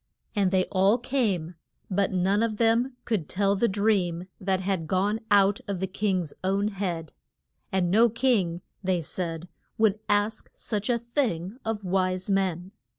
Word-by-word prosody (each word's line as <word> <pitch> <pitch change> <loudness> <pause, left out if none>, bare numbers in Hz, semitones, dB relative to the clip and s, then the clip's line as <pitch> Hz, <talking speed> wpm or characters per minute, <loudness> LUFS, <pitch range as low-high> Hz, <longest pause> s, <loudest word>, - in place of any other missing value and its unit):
And 200 -3 +3
they 185 -1 +2
all 195 +4 +4
came, 220 - -1 0.3
but 200 0 +1
none 190 +3 +2
of 225 -2 0
them 235 +3 +2
could 205 -10 -1
tell 200 +1 +2
the 235 +4 +2
dream 190 -4 +1
that 190 -1 0
had 185 -4 -2
gone 200 +5 +1
out 200 0 +4
of 200 -3 -2
the 190 - 0
king's 185 -4 -1
own 195 +2 +1
head. 175 -6 -4 0.6
And 180 -2 +1
no 230 +4 +5
king, 210 -8 +1 0.2
they 185 -2 +1
said, 165 +1 -4 0.3
would 215 -1 +3
ask 205 +1 +1
such 210 -1 -3
a 240 - +3
thing 235 - -2
of 220 -2 -3
wise 185 +1 0
men. 190 -2 0
195 Hz, 155 wpm, -27 LUFS, 185-215 Hz, 0.6 s, no